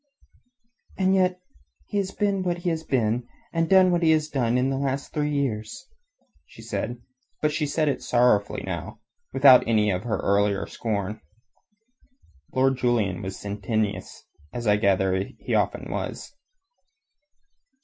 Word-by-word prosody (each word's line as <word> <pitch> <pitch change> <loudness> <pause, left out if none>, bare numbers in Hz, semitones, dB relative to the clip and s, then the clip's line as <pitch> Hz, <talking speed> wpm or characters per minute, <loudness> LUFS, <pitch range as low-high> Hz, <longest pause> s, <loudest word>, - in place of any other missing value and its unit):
"And 190 0 +2
yet 185 -1 +2 0.5
he 205 - -4
has 195 -1 -1
been 200 -1 0
what 175 -1 -1
he 175 0 -1
has 160 -1 -3
been 120 -3 0 0.3
and 165 -1 0
done 190 -1 +6
what 175 0 +1
he 165 - +3
has 155 -1 0
done 125 -4 +1
in 130 +2 +1
these 135 - -1
last 140 0 -3
three 150 -1 0
years," 120 -7 -3 0.7
said 120 - -4
she, - - -28 0.4
but 150 - +1
she 150 0 -1
said 155 +2 0
it 140 - 0
sorrowfully 120 -4 +2
now, - - -5 0.3
without 135 -1 +7
any 105 -2 +3
of 90 -1 -1
her 110 -3 -1
earlier 100 0 +1
scorn. 105 -1 -3 1.3
Lord 135 0 +2
Julian 115 -8 0
was 95 0 -5
sententious, 105 +1 -3 0.3
as 120 +4 -5
I 105 -1 +4
gather 95 -2 +2
that 95 - -5
he - - -4
often - - 0
was. - - -5
125 Hz, 150 wpm, -25 LUFS, 105-155 Hz, 1.3 s, without